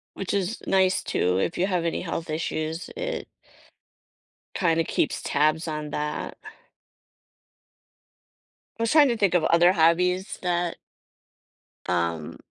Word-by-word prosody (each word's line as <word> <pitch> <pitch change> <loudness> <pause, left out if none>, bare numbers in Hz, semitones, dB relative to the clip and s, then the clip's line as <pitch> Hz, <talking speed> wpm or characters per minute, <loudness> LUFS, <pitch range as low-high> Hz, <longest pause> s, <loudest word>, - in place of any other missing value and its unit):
Which 195 - -3
is 200 +3 -2
nice, 190 -1 +3
too, 90 +1 0
if 130 - -1
you 185 - +1
have 180 -3 0
any 165 - -1
health 165 -1 -4
issues. 155 +1 -3
It - - -4 1.3
kinda 165 -3 +2
keeps 155 - -1
tabs 155 +3 +1
on 155 -1 -4
that. 150 +1 -4 2.4
I - - -2
was 230 - +1
trying 300 0 +6
to 240 - 0
think 200 -4 +2
of 175 -3 +3
other 170 +2 +5
hobbies 180 +3 +2
that 175 -1 -1 1.1
um 85 -3 -1
170 Hz, 125 wpm, -25 LUFS, 155-185 Hz, 2.4 s, trying